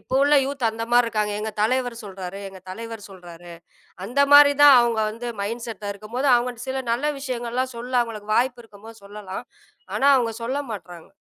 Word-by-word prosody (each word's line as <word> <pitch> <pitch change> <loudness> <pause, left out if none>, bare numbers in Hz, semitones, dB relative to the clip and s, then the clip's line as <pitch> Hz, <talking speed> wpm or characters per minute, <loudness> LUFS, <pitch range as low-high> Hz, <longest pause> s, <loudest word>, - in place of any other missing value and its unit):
இப்போ - - -6
உள்ள 290 +1 +4
யூத் 275 -2 -4
அந்த 225 +1 -4
மாறி 245 0 +6
இருக்காங்க, 210 -2 -1
"எங்க 220 +1 -3
தலைவர் 245 +1 0
சொல்றாரு, 190 -1 -7
எங்க 190 -1 -13
தலைவர் 225 +2 -7
சொல்றாரு," 175 -2 -12 0.5
அந்த 245 +8 -1
மாறி 285 0 +9
தான் 290 -1 +9
அவங்க 235 -2 +1
வந்து 230 +3 -7
மைண்ட்செட்டா 220 -1 -5
இருக்கும் 215 +3 -13
போது, 275 +3 +1
அவங்க 245 0 -1
சில 265 0 -2
நல்ல 295 +6 0
விஷயங்கள்லாம் 255 -1 -3
சொல்ல, 245 +2 -7
அவங்களுக்கு 215 -2 -6
வாய்ப்பு 245 0 0
இருக்கும் 210 -1 -16
போது 225 -2 -13
சொல்லலாம். 200 -1 -8 0.5
ஆனா 275 - +3
அவங்க 235 -3 0
சொல்ல 260 +4 -2
மாட்டறாங்க. 175 -5 -10
230 Hz, 180 wpm, -23 LUFS, 205-255 Hz, 0.5 s, மாறி